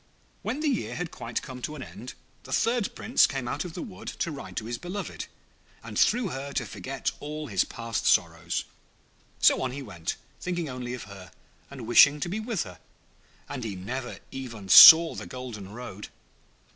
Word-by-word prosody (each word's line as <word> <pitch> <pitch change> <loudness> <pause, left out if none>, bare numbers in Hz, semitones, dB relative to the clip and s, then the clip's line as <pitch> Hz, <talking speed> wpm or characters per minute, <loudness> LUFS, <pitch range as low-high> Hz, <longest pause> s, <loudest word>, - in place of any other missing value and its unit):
When 285 - -3
the 315 - 0
year 270 -5 -1
had 175 -2 -4
quite 115 0 -5
come 125 -1 -9
to 150 - -4
an 135 - -7
end, 125 +1 -10 0.3
the 130 - -13
third 230 - 0
Prince 240 - +3
came 135 -3 -4
out 140 +5 -2
of 175 - -7
the - - -4
wood 210 -9 -11
to 170 - -3
ride 140 - -9
to 110 - -3
his 120 +1 -4
beloved, 185 +3 -6 0.6
and - - -9
through 235 -3 +3
her 140 0 -6
to - - -1
forget 135 +1 -4
all 150 +1 -6
his 100 -8 +1
past 115 -2 -4
sorrows. - - +1 0.8
So - - +5
on 130 - -1
he 140 +1 -6
went, 85 -8 -5 0.2
thinking 175 -2 -3
only 125 -2 -5
of 125 - -8
her, 95 -1 -11 0.4
and 135 -4 -9
wishing 140 +5 +6
to 175 - -2
be 200 +5 -3
with 220 - -2
her; 90 -6 -12 0.7
and 125 - -6
he 105 -4 -4
never 120 +7 -5
even 115 -7 -8
saw 165 - +11
the - - -7
golden 115 -6 -8
road. 105 -3 -8
130 Hz, 190 wpm, -27 LUFS, 115-165 Hz, 0.8 s, saw